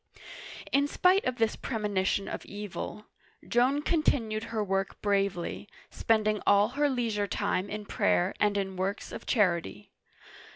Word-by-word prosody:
In 280 +1 +3
spite 365 +6 +3
of 255 - 0
this 225 -2 +1
premonition 205 -4 -1
of - - -5
evil, 205 +1 -6 0.4
Joan 260 +5 +2
continued 230 -10 +1
her 220 -2 -2
work 195 -1 -2
bravely, 200 -1 -1 0.2
spending 215 -2 +1
all 205 +1 +5
her 290 +3 +1
leisure 225 -6 -1
time 190 0 -1
in 210 0 -5
prayer 90 - +1
and 205 -1 +2
in 190 -1 -3
works 195 +3 -3
of - - -8
charity. 170 - 0
210 Hz, 135 wpm, -29 LUFS, 195-235 Hz, 0.4 s, all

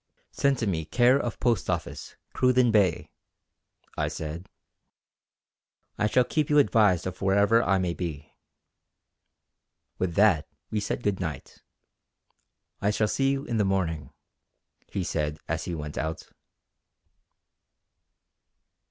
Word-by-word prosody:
"Send 140 -1 +1
to 115 - -2
me 85 -6 -1
care 120 - +3
of 120 -4 -4
Post 120 -5 +1
office, - - -4 0.2
Cruden 125 -2 +3
Bay," 100 -6 +2 0.8
I 75 - 0
said, 80 +3 -6 1.5
"I 105 - +1
shall 125 +4 +3
keep 150 +4 -1
you 150 - +3
advised 105 - +4
of 95 0 -6
wherever 100 +4 +4
I 100 -4 +2
may 90 -2 -1
be." 80 -3 -6 1.7
With 90 -3 -1
that 100 -7 +4 0.2
we 110 - 0
said 105 +3 -3
good 100 -2 0
night. 80 -5 -6 1.2
"I 100 - +2
shall 105 +1 +1
see 135 +5 +1
you 140 +1 -1
in 120 -6 -2
the 105 - +3
morning," 90 -6 -1 0.8
he 95 - -3
said 75 -3 -2
as 80 0 -2
he 85 - -3
went 75 -1 -5
out. 80 0 -4
95 Hz, 125 wpm, -27 LUFS, 80-115 Hz, 1.7 s, advised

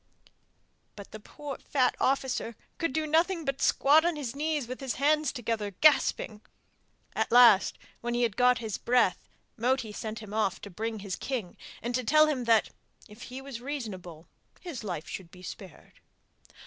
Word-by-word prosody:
But 200 -2 -11
the 215 - -8
poor 280 +5 -8
fat 255 -3 +1
officer 260 -3 0 0.2
could 330 - 0
do 315 +3 -1
nothing 330 +2 +1
but 275 0 -2
squat 295 +3 +5
on 345 -1 +1
his 275 -4 -5
knees 300 -3 -1
with 255 +1 -6
his 265 -3 -2
hands 300 +2 +2
together, 225 -4 -3
gasping. 260 -7 +3 0.7
At - - -1
last, 235 -5 +6 0.2
when 240 0 -3
he 240 0 +3
got 250 +3 +3
his 220 -4 -4
breath, 235 -7 +1 0.3
Moti 245 -1 0
sent 215 +1 -5
him 215 -2 -9
off 205 -4 0
to 200 - -9
bring 220 +3 -4
his 195 -2 -4
king, 235 -10 -4 0.3
and 240 +1 -2
to 255 +1 0
tell 305 +6 +5
him 275 -5 -1
that 225 -2 +3 0.4
if 210 +3 -15
he 255 +2 -7
was 270 -3 -8
reasonable 190 - -6 0.3
his 320 -11 -7
life 175 -6 -5
should 185 -3 -7
be 180 +1 -15
spared. 185 -2 -11
245 Hz, 170 wpm, -29 LUFS, 215-280 Hz, 0.7 s, last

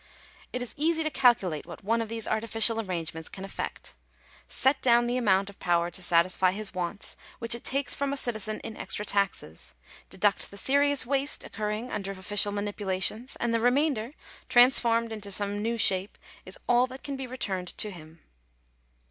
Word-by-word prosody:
It 250 - -3
is 245 - -3
easy 320 +2 +1
to 310 - -2
calculate 230 - +2
what 175 - -10
one 230 +3 +1
of 225 - -5
these 225 -1 -2
artificial 225 +1 +3
arrangements 165 -5 -4
can 195 -1 -8
effect 195 - -7 0.5
Set 265 +1 +3
down 240 -1 +4
the 240 +1 -1
amount 200 -5 +2
of 200 - -12
power 175 -1 +1
to 185 - -5
satisfy 180 +1 +3
his 210 0 -5
wants, 185 +2 -4 0.2
which 230 0 +1
it 235 - -3
takes 275 +1 +2
from 280 -1 -2
a 280 - -2
citizen 215 -4 +1
in 220 - -7
extra 210 - -2
taxes; 80 - -2 0.3
deduct 205 +1 0
the 200 - -12
serious 285 +4 +3
waste 275 +2 0
occurring 215 +3 -4
under 195 -2 -4
official 205 +2 +4
manipulations; 205 +3 -1
and 235 -1 -2
the 230 - +2
remainder, 250 0 +1 0.4
transformed 235 -2 +4
into 210 -2 -6
some 205 +1 0
new 230 +2 -1
shape, 190 -2 +2 0.3
is - - -3
all 245 +1 +4
that 260 +1 -11
can 285 -1 -4
be 265 -1 -6
returned 190 -8 -4
to 210 - 0
him. 160 -2 -13
215 Hz, 175 wpm, -27 LUFS, 190-245 Hz, 0.5 s, down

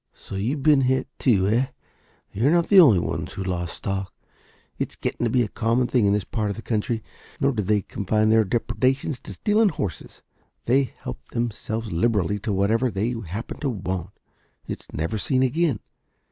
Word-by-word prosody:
"So - - -11
you've 120 +9 -2
been 150 -2 +5
hit 130 +1 +1
too, 100 -7 +3
eh? 120 +5 +2 0.7
You 115 +7 +1
are - - +6
not 170 +1 +3
the 200 - +8
only 135 - +8
ones 85 - -3
who 95 - -4
have - - -6
lost 85 -1 -3
stock. 95 -1 -3 0.7
It's - - -3
getting - - -2
to - - +1
be 125 +1 +3
a - - -2
common 115 +3 +1
thing 120 -4 +2
in 100 - +3
this 105 -1 +1
part 105 +1 -2
of 100 - -3
the 115 - -8
country. 110 0 -1 0.4
Nor 140 0 +3
do 115 -5 -1
they 105 0 +1
confine 105 +2 0
their 110 0 +5
depredations 130 +6 0
to - - -9
stealing 215 0 +3
horses. 105 - -5 0.4
They 135 +3 +3 0.2
help 60 - -6
themselves 115 -1 -3
liberally 105 +1 +1
to 105 - -3
whatever 110 +6 +2
they 110 +3 -1
happen 100 +8 -6
to 145 - -1
want. 95 -5 -3 0.6
It's - - -7
never 80 +8 -2
seen 130 +4 +1
again. 140 -2 +1
110 Hz, 190 wpm, -24 LUFS, 100-130 Hz, 0.7 s, the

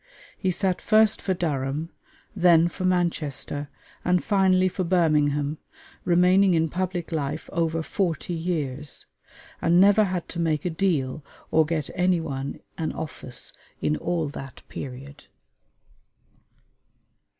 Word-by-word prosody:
He 190 - -1
sat 185 0 0
first 215 -1 +4
for 190 - 0
Durham, 150 -1 -2 0.4
then 170 -3 +5
for 185 +1 -5
Manchester, 155 -5 -1 0.3
and 180 0 +2
finally 190 -3 +3
for 185 +1 -2
Birmingham, 150 -4 +2 0.5
remaining 180 +2 +4
in 160 0 +2
public 180 0 -3
life 145 -4 -3
over 165 -1 0
forty 175 -1 -2
years; 150 -5 -2 0.6
and 170 +1 +4
never 205 +2 +6
had 180 -3 -3
to 170 - -5
make 160 -2 0
a 180 - 0
"deal" 155 -6 0 0.3
or 160 -1 +4
get 155 -3 -2
any 180 -1 +2
one 140 -4 -5 0.2
an 160 - -1
office 145 -5 -4 0.3
in 150 - +1
all 170 -2 -1
that 135 -1 -9
period. 140 +2 -8
165 Hz, 125 wpm, -25 LUFS, 150-180 Hz, 0.6 s, never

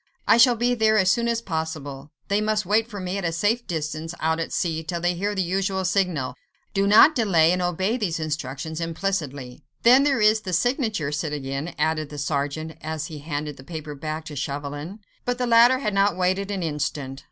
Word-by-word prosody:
I - - +6
shall 240 +1 +6
be 240 +2 +1
there 220 -2 +3
as 190 -2 +4
soon 235 +4 +1
as 230 0 -1
possible—they 160 +1 -4
must 215 -1 0
wait 215 +4 +2
for 205 -3 -7
me 185 +1 -3
at - - -6
a 170 - 0
safe 210 +8 0
distance 160 0 -4
out 160 +1 0
at 165 - -3
sea, 160 -2 -1
till 170 +2 -3
they 175 +1 +1
hear 200 +4 -2
the 190 - +1
usual 190 +1 -1
signal. 180 -7 0 0.4
Do 200 -1 +1
not 215 +10 +7
delay—and 180 - +3
obey 185 +6 0
these 180 -8 -2
instructions 155 0 -4
implicitly." 160 -7 -3 0.2
"Then 250 +3 +7
there 280 -3 +2
is 215 +1 +4
the 185 -3 -5
signature, 220 - 0
citoyen," 150 0 -3
added 155 -2 0
the 150 - -8
sergeant, 145 +2 -3
as 155 0 -4
he 150 - -6
handed 145 -1 -4
the 130 - -12
paper 155 0 -7
back 155 +2 -5
to 150 - -8
Chauvelin. 145 - -5 0.2
But 245 0 -1
the 250 - -1
latter 240 +2 +6
had 215 -6 -2
not 195 -2 +2
waited 185 +2 0
an 195 -3 -2
instant. 145 -3 -3
175 Hz, 200 wpm, -24 LUFS, 155-210 Hz, 0.4 s, not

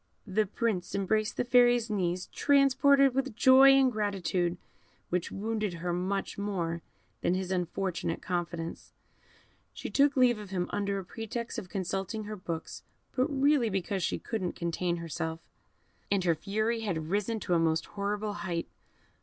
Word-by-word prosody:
The 210 +1 +1
Prince 205 -3 -2
embraced 215 +2 0
the - - +1
Fairy's 245 -1 +5
knees, 180 -3 -1
transported 275 -1 +4
with 270 -3 -1
joy 265 +3 +8
and 270 -1 +5
gratitude, 185 -5 -1 0.5
which 180 -1 -1
wounded 215 -2 -2
her 175 +1 -3
much 190 +3 -2
more 170 -5 -2 0.4
than 180 - +1
his 185 0 -3
unfortunate 180 -1 -2
confidence; 170 -2 -4 0.8
she - - -6
took 280 0 +3
leave 245 -3 +4
of 205 -2 -9
him 180 -2 -1
under 200 -1 -1
a 190 - -5
pretext 230 +3 -5
of 180 - -10
consulting 195 +3 -3
her 210 +1 -6
books, 170 -4 -6 0.3
but 255 +1 +2
really 280 -4 +3
because 195 0 -2
she - - 0
could 225 -3 -4
not 180 - -2
contain 170 +1 -1
herself, 160 -1 -4 0.7
and 200 -2 +1
her 170 -2 +3
fury 215 +7 -1
had 170 -7 -3
risen 210 +3 0
to 180 - -1
a 170 - +4
most 160 -1 +1
horrible 205 +1 -3
height. 175 -5 -3
200 Hz, 155 wpm, -30 LUFS, 175-230 Hz, 0.8 s, joy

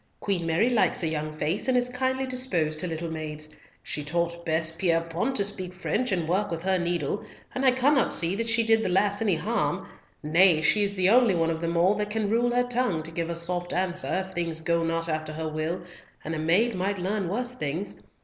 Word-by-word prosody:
Queen 180 -5 -1
Mary 205 +10 +2
likes 220 -5 +2
a - - +1
young 155 -1 -3
face, 155 - -2
and 255 -1 +3
is 245 0 +2
kindly 260 +1 -1
disposed 185 -13 -1
to 180 - 0
little 165 0 -4
maids. 155 -1 -6 0.3
She 150 - -3
taught 170 +3 -2
Bess 160 -1 +2
Pierrepoint 165 +7 0
to 200 - +1
speak 185 -3 -4
French 225 +6 -1
and 175 -4 0
work 195 +4 0
with 165 0 -4
her 190 -1 +1
needle, 175 +1 -1 0.3
and 260 - -2
I 265 - +6
cannot 260 +1 +3
see 170 +3 +1
that 230 +1 -1
she 225 +1 +4
did 225 0 +4
the 215 - -1
lass 200 +3 +1
any 205 -6 +2
harm, 160 - -1 0.4
nay, 165 +2 +5
she 205 +7 +4
is 200 0 -1
the 185 +1 +3
only 235 -5 +5
one 165 -1 +1
of 160 0 -4
them 170 0 -1
all 180 +4 +4
that 210 0 -2
can 210 -1 -1
rule 240 +2 +2
her 245 +1 +2
tongue 245 -9 0
to 160 - -6
give 165 0 -3
a 170 - -2
soft 175 +1 -1
answer 185 +1 0
if 190 - -14
things 165 -2 -2
go 170 +1 +1
not 165 0 -1
after 155 -1 -3
her 160 +1 -4
will, 155 +3 -3 0.4
and 160 - -4
a 160 - -3
maid 185 +10 +2
might 195 +2 -1
learn 190 0 -2
worse 245 +5 -2
things. 180 - -4
180 Hz, 225 wpm, -26 LUFS, 165-215 Hz, 0.4 s, I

